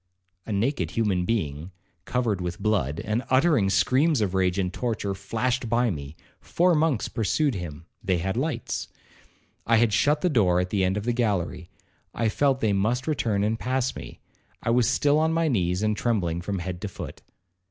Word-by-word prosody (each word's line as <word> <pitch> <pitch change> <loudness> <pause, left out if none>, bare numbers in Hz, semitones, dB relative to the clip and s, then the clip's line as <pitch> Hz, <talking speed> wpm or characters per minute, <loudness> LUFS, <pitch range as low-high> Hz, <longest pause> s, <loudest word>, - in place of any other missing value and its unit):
A - - -4
naked 100 - 0
human 100 -6 +1
being, 80 -7 -2 0.4
covered 115 -6 -1
with 90 -1 -3
blood, 90 - 0
and 110 +3 -1
uttering 130 - +3
screams 135 +8 +3
of 100 -4 0
rage 95 -1 +1
and 95 -2 -1
torture, 110 -4 -2
flashed 115 +5 -2
by 120 0 +2
me; 70 -2 -7 0.2
four 180 +1 +2
monks 155 -7 +1
pursued 125 +6 0
him—they 85 +1 -4
had 95 +4 -2
lights. 150 +6 -2 0.8
I 115 0 +5
had 110 -2 +3
shut 150 +7 +2
the - - +2
door 95 - +3
at 90 0 -2
the 100 -2 +1
end 95 +2 +1
of 105 - -3
the 120 +2 0
gallery—I 105 0 -3
felt 135 +3 +1
they 110 -2 +2
must 115 +6 0
return 115 -9 0
and 110 +2 0
pass 130 0 -1
me—I 115 - -8
was 120 -1 +3
still 145 +3 +3
on 160 +1 +2
my 165 0 +1
knees, 90 - 0
and 105 0 +1
trembling 90 -8 -1
from 100 +2 -3
head 90 0 -5
to 105 - -3
foot. 95 - -8
110 Hz, 175 wpm, -25 LUFS, 95-125 Hz, 0.8 s, I